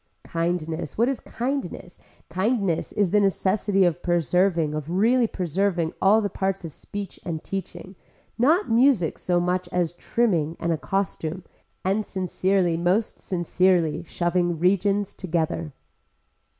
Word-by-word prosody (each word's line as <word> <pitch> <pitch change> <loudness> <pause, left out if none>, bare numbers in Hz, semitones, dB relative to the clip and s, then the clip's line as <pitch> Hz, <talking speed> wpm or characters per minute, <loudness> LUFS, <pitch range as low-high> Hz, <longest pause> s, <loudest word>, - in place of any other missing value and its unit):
Kindness 165 -2 -2
what 235 +2 +3
is 270 - -2
kindness, 245 -8 -4 0.3
kindness 195 -2 0
is 200 -4 +1
the 210 - +4
necessity 195 0 +2
of 175 0 0
preserving 175 -2 +1
of 155 0 -4
really 230 +7 +3
preserving 180 -2 -1
all 210 +3 +5
the 205 - 0
parts 190 -1 -2
of 160 - -7
speech 200 -2 -7
and 160 -3 -4
teaching, 185 -1 -6 0.4
not 315 - +3
music 230 - +3
so 175 -1 +1
much 180 0 -1
as 175 -2 0
trimming 175 -5 0
and 170 - -1
a 165 - +1
costume, 185 -2 -2 0.4
and 195 +3 +1
sincerely 185 -2 0
most 180 +6 0
sincerely 175 -3 +1
shoving 175 0 0
regions 195 +3 +1
together. 165 -3 -2
185 Hz, 130 wpm, -24 LUFS, 170-200 Hz, 0.4 s, all